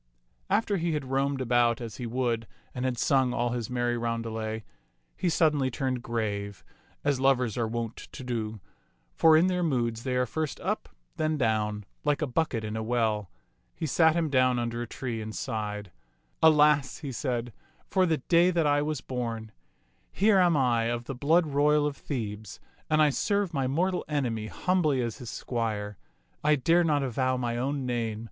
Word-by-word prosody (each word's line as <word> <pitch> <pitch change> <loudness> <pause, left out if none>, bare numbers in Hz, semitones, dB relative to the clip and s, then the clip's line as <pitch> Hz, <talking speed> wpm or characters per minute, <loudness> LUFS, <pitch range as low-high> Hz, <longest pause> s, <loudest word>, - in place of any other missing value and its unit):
After 205 0 +2
he 170 -1 -1
had 135 -4 -3
roamed 135 0 0
about 120 -1 +2
as 115 -4 -7
he 120 - -4
would 115 -2 -1 0.3
and 125 0 -3
had 125 -2 -1
sung 130 -1 +2
all 120 +1 +1
his 120 -3 -3
merry 120 -1 0
roundelay, 115 -2 -3 0.5
he 180 - 0
suddenly 150 -5 +2
turned 130 0 -2
grave, 100 -4 -3 0.4
as 145 -2 +1
lovers 130 -4 +2
are 120 -2 0
wont 115 0 -4
to - - -8
do; 110 -3 -3 0.5
for 160 - +6
in 165 - +5
their 180 -1 +1
moods 120 -8 0
they 130 0 -2
are 125 0 +2
first 155 +2 -3
up, - - -2 0.3
then 155 0 0
down, 105 -4 0 0.2
like 145 -1 +1
a - - +2
bucket 130 -4 -1
in 105 0 -4
a 110 - -2
well. 110 -4 0 0.5
He - - -3
sat 160 +2 +4
him 165 -3 0
down 130 -2 +3
under 120 0 -2
a 120 - -4
tree 115 -2 -4
and 110 0 -6
sighed. 105 -5 -4 0.5
Alas," 150 -3 +5
he 145 -4 -6
said, 120 -2 -3 0.3
"for 185 -1 +2
the 160 -2 +2
day 170 +6 +3
that 170 -3 +1
I 145 0 +3
was 150 -2 -2
born. 115 -3 -4 0.6
Here 200 0 +4
am 175 -4 +4
I 120 -4 +2
of 120 +1 -1
the 135 - -5
blood 160 +7 +3
royal 150 0 +3
of 145 -1 -1
Thebes, 110 - -5 0.3
and 155 0 +4
I 150 - +4
serve 200 +4 0
my 135 -3 0
mortal 180 +7 0
enemy 120 -8 -1
humbly 165 -2 +1
as 115 +3 -4
his 120 -3 -7
squire. 105 -6 -3 0.4
I 150 0 +5
dare 165 +6 +3
not 150 -4 +2
avow 130 0 0
my 120 -2 -2
own 135 +2 -1
name. 115 -3 -2
130 Hz, 180 wpm, -28 LUFS, 115-150 Hz, 0.6 s, for